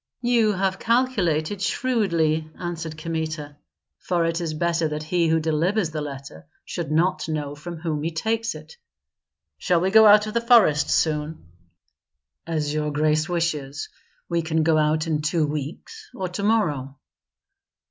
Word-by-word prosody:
"You 235 -3 +3
have 190 0 -1
calculated 205 -8 0
shrewdly," 170 -11 0
answered 170 -3 -5
Kmita, 155 -2 -4 0.4
"for 175 -2 0
it 165 +1 -1
is 160 -2 -3
better 170 0 0
that 150 0 -4
he 170 +2 +1
who 160 0 +3
delivers 165 +4 0
the 155 -1 -3
letter 135 - -8 0.2
should - - -5
not 165 +2 +1
know 150 -2 -3
from 165 +4 -8
whom 155 -2 -3
he 160 - -1
takes 225 +7 -2
it. 485 - -12 0.8
Shall 175 -2 +2
we 185 +3 0
go 220 +1 +8
out 210 0 +7
of 215 - -6
the 235 - +1
forest 230 - +4
soon?" 155 - 0 1.0
"As 155 -3 -1
your 150 0 -1
grace 155 +2 +1
wishes. 150 -5 -2 0.4
We 170 -1 0
can 160 0 0
go 160 -1 +3
out 155 +1 +1
in 155 -2 -1
two 150 +1 +1
weeks, 155 - -6
or 185 - -3
to 180 +3 -5
morrow." 150 - 0
165 Hz, 155 wpm, -23 LUFS, 155-190 Hz, 1.0 s, go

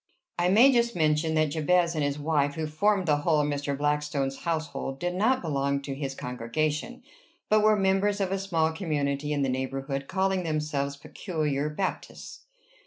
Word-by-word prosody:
I 175 +1 +3
may 235 +8 +7
just 235 -1 +2
mention 160 0 +1
that 155 -2 +2
Jabez 170 +2 +2
and 155 -3 -1
his 145 0 -1
wife, 145 -1 0
who 160 -1 -2
formed 190 +5 +1
the 150 -3 +3
whole 150 +1 +2
of 145 - 0
Mr. 145 -1 -2
Blackstone's 145 -2 -1
household, 155 -5 -3
did 175 +2 -2
not 225 +7 +1
belong 140 -3 0
to 140 - -4
his 135 -1 -4
congregation, 150 - -3 0.5
but 215 0 +4
were 215 0 +5
members 195 +1 +1
of 190 -2 -1
a 195 - 0
small 165 -5 0
community 150 -4 -2
in 145 -1 0
the - - +1
neighborhood, 135 +1 -3
calling 190 0 0
themselves 150 -3 -2
Peculiar 150 -2 -3
Baptists. 185 +5 -5
155 Hz, 175 wpm, -27 LUFS, 140-180 Hz, 0.5 s, may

